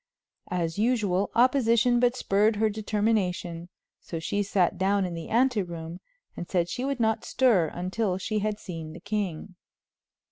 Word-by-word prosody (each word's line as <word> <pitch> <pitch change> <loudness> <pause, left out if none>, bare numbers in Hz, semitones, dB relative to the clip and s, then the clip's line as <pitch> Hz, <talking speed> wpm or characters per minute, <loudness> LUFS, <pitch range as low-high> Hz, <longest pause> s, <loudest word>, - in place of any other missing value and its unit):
As 170 0 -2
usual, 210 -5 +1
opposition 240 -1 +4
but 245 0 +3
spurred 210 -2 +2
her 215 +1 +2
determination, 200 -5 -1 0.3
so 165 - -6
she 200 +5 -1
sat 190 -2 +1
down 195 +1 +2
in 180 - -4
the 165 -1 -7
ante 245 -1 +2
room 170 -1 -7 0.4
and 175 - -7
said 175 -2 0
she 245 - -3
would 275 -1 -2
not 220 -1 +1
stir 225 -11 +3
until 185 +3 -2
she 215 +3 -2
had 210 0 -1
seen 165 -4 -7
the 170 - -10
king. 200 -2 -3
200 Hz, 155 wpm, -27 LUFS, 175-225 Hz, 0.4 s, opposition